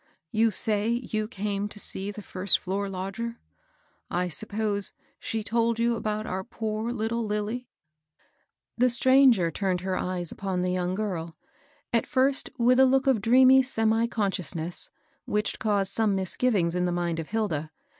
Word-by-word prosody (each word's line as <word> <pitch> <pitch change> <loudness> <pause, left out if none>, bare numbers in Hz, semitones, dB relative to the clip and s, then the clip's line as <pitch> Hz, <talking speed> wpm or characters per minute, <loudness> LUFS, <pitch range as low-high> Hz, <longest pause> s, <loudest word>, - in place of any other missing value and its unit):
You 225 +1 +3
say 210 0 0
you 225 -3 -2
came 205 -2 -3
to 210 - -8
see 195 0 +1
the 205 0 -8
first 190 +1 +1
floor 195 +2 -3
lodger? 195 +5 -5 0.7
I 180 +1 -1
suppose 205 +2 -3 0.3
she 220 -1 -3
told 230 +1 +1
you 235 0 +1
about 215 -1 -3
our 190 -1 -3
poor 220 0 -3
little 230 0 -2
Lilly? 215 +3 -3 0.6
" - - -45
The 250 +1 +5
stranger 245 -7 +5
turned 185 +1 -1
her 185 0 -2
eyes 180 -2 -3
upon 190 -2 -3
the 180 - 0
young 180 0 -1
girl, 170 -6 -4 0.6
at 230 - +2
first 265 +1 +2
with 250 +1 +4
a 265 - +8
look 265 +1 +2
of 260 -6 +3
dreamy 255 +4 +6
semi 225 -2 +1
conscious 195 -7 -2
ness,^hich 175 +5 -5
caused 200 -3 0
some 215 -3 +2
misgivings 190 -2 +1
in 180 0 0
the 175 - 0
mind 175 -1 -1
of 160 - -6
Hilda. 180 -9 -2
210 Hz, 160 wpm, -27 LUFS, 185-230 Hz, 0.7 s, a